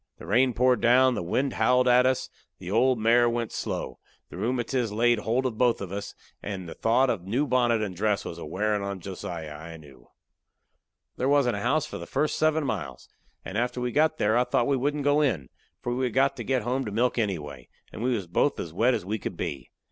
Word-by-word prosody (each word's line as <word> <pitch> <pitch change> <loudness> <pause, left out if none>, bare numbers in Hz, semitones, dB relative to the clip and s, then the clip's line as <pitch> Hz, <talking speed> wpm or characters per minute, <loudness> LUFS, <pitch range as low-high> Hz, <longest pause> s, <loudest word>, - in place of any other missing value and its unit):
The - - -11
rain 125 +4 +3
poured 125 +1 +3
down; 130 +2 +5
the - - -2
wind 130 +10 -1
howled 125 0 +3
at 125 +1 +5
us; 130 -1 0 0.3
the 90 0 -7
old 125 +4 +3
mare 120 +2 +4
went 115 -1 -2
slow; - - -4 0.3
the - - -9
rheumatiz 120 -1 -1
laid 120 +2 +2
holt 120 +5 0
of 115 -4 -3
both 120 -2 +3
of 95 -2 -6
us; 100 +1 -6 0.3
and 95 -3 -5
the 80 - -7
thought 125 +3 +2
of 95 -7 -4
the 95 - -11
new 130 +8 +1
bonnet 120 -4 +2
and 95 -4 -4
dress 105 +2 0
was 85 - -6
a - - -7
wearin' 105 +6 -1
on 100 -1 -4
Josiah, 85 -4 -6
I 80 +2 -9
knew. 70 -6 -17 1.1
There 130 - 0
wasn't 135 -6 +3
a - - -4
house 145 +6 +1
for - - -7
the - - -8
first 150 +3 0
seven 155 -1 +2
miles, 80 - -5 0.4
and 100 +4 -3
after 125 +1 -1
we 125 0 -2
got 155 +4 +2
there 110 +2 +2
I 120 - +4
thought 120 - +1
we 140 - +2
wouldn't 145 +3 -1
go 145 +1 +3
in, 90 - 0 0.3
for 120 - -1
we 130 +1 0
had 125 - -3
got 135 +1 +3
to 120 - -4
get 130 0 0
home 130 +4 -1
to 105 - -4
milk 120 +3 +1
anyway, 75 - -4 0.2
and - - -7
we 125 +1 +1
was 100 -5 -4
both 90 +11 0
as 80 - -5
wet 120 +7 +3
as - - -5
we 105 +3 -2
could - - -6
be. 70 - -5
120 Hz, 235 wpm, -26 LUFS, 100-130 Hz, 1.1 s, down